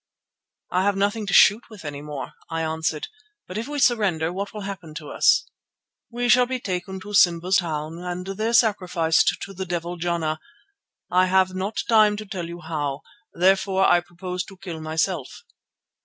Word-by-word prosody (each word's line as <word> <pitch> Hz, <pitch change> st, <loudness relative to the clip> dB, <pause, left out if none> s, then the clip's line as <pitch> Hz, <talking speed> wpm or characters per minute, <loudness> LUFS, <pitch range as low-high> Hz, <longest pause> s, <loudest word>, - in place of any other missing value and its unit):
"I 180 Hz, -, +2 dB
have 200 Hz, +1 st, +2 dB
nothing 205 Hz, +2 st, 0 dB
to -, -, -2 dB
shoot 215 Hz, +4 st, +6 dB
with 210 Hz, -7 st, -12 dB
any 145 Hz, -1 st, -5 dB
more," 150 Hz, -2 st, -6 dB, 0.2 s
I 165 Hz, -1 st, -2 dB
answered. 160 Hz, -1 st, -2 dB, 0.4 s
"But 185 Hz, +4 st, -4 dB
if 230 Hz, -, -5 dB
we 295 Hz, 0 st, -4 dB
surrender, 195 Hz, -, +2 dB
what 200 Hz, +2 st, -4 dB
will 210 Hz, -, -7 dB
happen 185 Hz, -6 st, -7 dB
to 155 Hz, -2 st, -7 dB
us?" -, -, +3 dB, 0.6 s
"We 245 Hz, +1 st, -2 dB
shall 245 Hz, +1 st, +5 dB
be 255 Hz, 0 st, -2 dB
taken 190 Hz, -2 st, -4 dB
to 205 Hz, +2 st, -9 dB
Simba's 180 Hz, -1 st, +4 dB
town 160 Hz, -1 st, -3 dB
and 180 Hz, 0 st, -5 dB
there 215 Hz, +4 st, -2 dB
sacrificed 180 Hz, -8 st, +3 dB
to 195 Hz, -, -8 dB
the 190 Hz, 0 st, -5 dB
devil 175 Hz, 0 st, -3 dB
Jana—I 175 Hz, -, -3 dB
have 185 Hz, 0 st, +3 dB
not 190 Hz, +3 st, -2 dB
time 215 Hz, -2 st, +5 dB
to 215 Hz, -, -6 dB
tell 185 Hz, -4 st, -5 dB
you 170 Hz, +1 st, -8 dB
how. 150 Hz, -3 st, -3 dB, 0.3 s
Therefore 190 Hz, +2 st, +3 dB
I 175 Hz, -, +5 dB
propose 180 Hz, +1 st, -5 dB
to 195 Hz, -, -13 dB
kill 175 Hz, -4 st, -7 dB
myself." 160 Hz, -1 st, -2 dB
185 Hz, 170 wpm, -24 LUFS, 165-205 Hz, 0.6 s, shoot